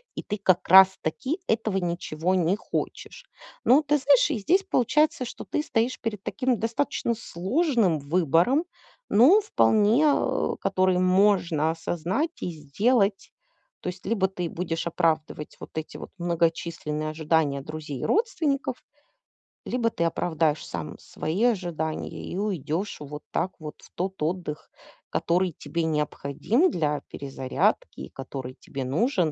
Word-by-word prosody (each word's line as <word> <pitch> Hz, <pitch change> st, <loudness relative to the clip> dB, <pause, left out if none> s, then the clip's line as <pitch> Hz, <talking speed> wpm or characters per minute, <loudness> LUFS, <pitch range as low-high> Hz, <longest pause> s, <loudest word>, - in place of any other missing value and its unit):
и -, -, -5 dB
ты 210 Hz, -, -3 dB
как 185 Hz, -2 st, +2 dB
раз-таки 190 Hz, -, +5 dB
этого 220 Hz, -3 st, 0 dB
ничего 175 Hz, -1 st, -1 dB
не 180 Hz, +1 st, +2 dB
хочешь. -, -, -5 dB, 0.4 s
Ну 275 Hz, +5 st, +6 dB
ты 295 Hz, 0 st, +2 dB
знаешь, 275 Hz, +2 st, +4 dB
и 250 Hz, -, -1 dB
здесь 365 Hz, -, +2 dB
получается, 305 Hz, -, +2 dB
что -, -, -8 dB
ты 300 Hz, -, -2 dB
стоишь 245 Hz, -3 st, -1 dB
перед 210 Hz, -4 st, -4 dB
таким 255 Hz, -2 st, 0 dB
достаточно 230 Hz, +1 st, -1 dB
сложным 220 Hz, -, 0 dB
выбором, 170 Hz, -, +2 dB, 0.4 s
но 270 Hz, -, +6 dB
вполне, 225 Hz, -, +3 dB
э, 290 Hz, -, +1 dB
который 185 Hz, -1 st, +2 dB
можно 185 Hz, -4 st, +3 dB
осознать 175 Hz, -, -2 dB
и -, -, -2 dB
сделать. 195 Hz, -, 0 dB, 0.5 s
То -, -, -3 dB
есть 180 Hz, 0 st, -9 dB
либо 200 Hz, -2 st, +1 dB
ты 180 Hz, -3 st, -4 dB
будешь 165 Hz, -1 st, -3 dB
оправдывать 160 Hz, -3 st, -1 dB
вот -, -, -9 dB
эти 160 Hz, -, -5 dB
вот -, -, -9 dB
многочисленные 165 Hz, -3 st, -1 dB
ожидания 155 Hz, -3 st, +1 dB
друзей 150 Hz, -2 st, -6 dB
и -, -, -2 dB
родственников, 310 Hz, -, 0 dB, 0.8 s
либо 240 Hz, -2 st, 0 dB
ты 170 Hz, -, -2 dB
оправдаешь 160 Hz, -2 st, 0 dB
сам 80 Hz, -3 st, -6 dB
свои 170 Hz, +8 st, -3 dB
ожидания 175 Hz, -9 st, -1 dB
и 180 Hz, -, -7 dB
уйдешь 185 Hz, -2 st, -2 dB
вот 150 Hz, +1 st, -8 dB
так 180 Hz, +3 st, -1 dB
вот 150 Hz, -2 st, -7 dB
в -, -, -17 dB
тот 190 Hz, 0 st, -3 dB
отдых, 160 Hz, -2 st, -3 dB, 0.4 s
который 180 Hz, +1 st, +1 dB
тебе 170 Hz, 0 st, -3 dB
необходим 155 Hz, -, 0 dB
для 150 Hz, -, -1 dB
перезарядки 135 Hz, -2 st, -2 dB
и 65 Hz, -, -7 dB
который 130 Hz, -1 st, -7 dB
тебе 135 Hz, -1 st, -6 dB
нужен, 170 Hz, -, +1 dB
180 Hz, 135 wpm, -26 LUFS, 155-230 Hz, 0.8 s, Ну